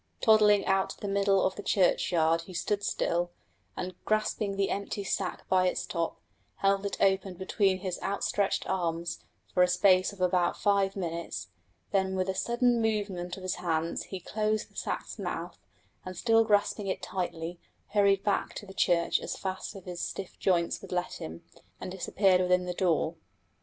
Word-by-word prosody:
Toddling 210 -3 +5
out 190 0 +2
to - - -8
the 205 - -4
middle 200 -1 +3
of 190 0 0
the - - -6
churchyard 170 -4 +2
he 185 - -9
stood 205 +4 0
still, 175 -3 0 0.5
and 185 +1 -4
grasping 215 -1 0
the 195 -1 +1
empty 200 0 -3
sack 190 -1 -2
by 185 -1 +3
its - - -1
top, 170 -2 -2 0.4
held 195 0 +1
it - - -4
open 190 -1 +2
between 190 +1 +1
his 185 -2 -4
outstretched 200 0 0
arms 170 -2 -2 0.3
for 180 - +3
a 180 - +6
space 185 +1 +4
of 200 - -14
about 180 -1 +2
five 200 -1 +2
minutes; 170 -3 -4 0.4
then 190 -2 +1
with 185 0 0
a - - +1
sudden 240 +3 +2
movement 200 -5 -1
of 190 - -9
his 185 - -2
hands 165 -1 -1
he 190 - -6
closed 215 +3 -1
the - - -27
sack's - - -4
mouth, - - -4 0.4
and 185 -1 -7
still 225 +2 +4
grasping 205 -1 +1
it 190 - -2
tightly, 175 -2 -4 0.3
hurried 200 -1 +3
back 205 - 0
to - - -6
the 190 - -11
church 175 -3 +2
as - - -5
fast 190 +2 -4
as 195 - -10
his 180 -1 -5
stiff 195 -2 -5
joints 175 -3 +1
would - - -11
let 180 0 -2
him, 80 +1 -7 0.4
and - - -6
disappeared 190 0 +2
within 180 0 +2
the 180 - -2
door. 170 -2 +1
190 Hz, 180 wpm, -29 LUFS, 180-200 Hz, 0.5 s, a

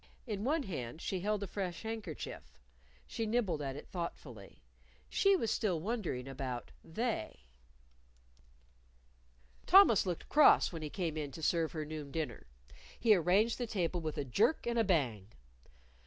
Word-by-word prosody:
In 210 -4 -4
one 295 +4 +1
hand 150 - -5
she 185 +2 -3
held 205 +2 -1
a - - -4
fresh 185 -1 -4
handkerchief. 205 - -6 0.5
She 225 - -3
nibbled 215 -9 0
at 135 -2 -3
it 145 - -9
thoughtfully. 125 - -7 0.5
She 395 0 +4
was 230 - 0
still 185 -7 0
wondering 180 - -3
about 130 -2 -5
"They." 220 - -3 2.3
Thomas 365 - +7
looked 175 -2 -3
cross 300 -9 +6
when 165 - -5
he 155 - -4
came 165 -3 -3
in 150 -2 -3
to 160 - -8
serve 165 0 +1
her 155 -2 -3
noon 150 -2 -6
dinner. 140 - -4 0.5
He 225 -2 +5
arranged 200 +7 +3
the 245 - -2
table 180 -5 -1
with 155 -1 -4
a 145 - -2
jerk 200 - +2
and 235 0 0
a - - +4
bang. 130 - 0
175 Hz, 155 wpm, -34 LUFS, 150-220 Hz, 2.3 s, Thomas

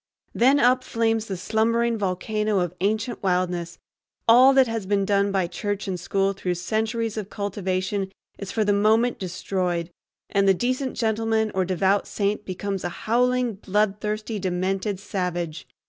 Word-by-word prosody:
Then 265 +4 +4
up 255 0 +4
flames 225 -1 0
the 190 - -4
slumbering 230 +4 +1
volcano 210 +1 -1
of 175 -1 -2
ancient 215 +4 -1
wildness, 180 -2 -1 0.5
all 250 +4 +8
that 265 -1 +6
has 225 -4 -4
been 200 -1 +1
done 200 0 +2
by 190 -2 +1
church 205 +4 -3
and 185 -2 -2
school 195 +3 0
through 180 -2 -2
centuries 220 +4 -2
of 210 -2 -4
cultivation 195 -1 -2 0.3
is 200 -1 -5
for 220 -2 0
the 205 - +3
moment 220 +4 +3
destroyed, 180 -2 -2 0.4
and 195 0 +2
the 195 - +5
decent 255 +5 -2
gentleman 220 -1 +1
or 190 -1 +1
devout 190 +2 +1
saint 205 +1 -1
becomes 195 +1 -4
a 175 - -1 0.2
howling, 250 +1 +2
bloodthirsty, 210 +2 -1
demented 190 +2 -1
savage. 175 -5 -3
205 Hz, 150 wpm, -24 LUFS, 185-225 Hz, 0.5 s, all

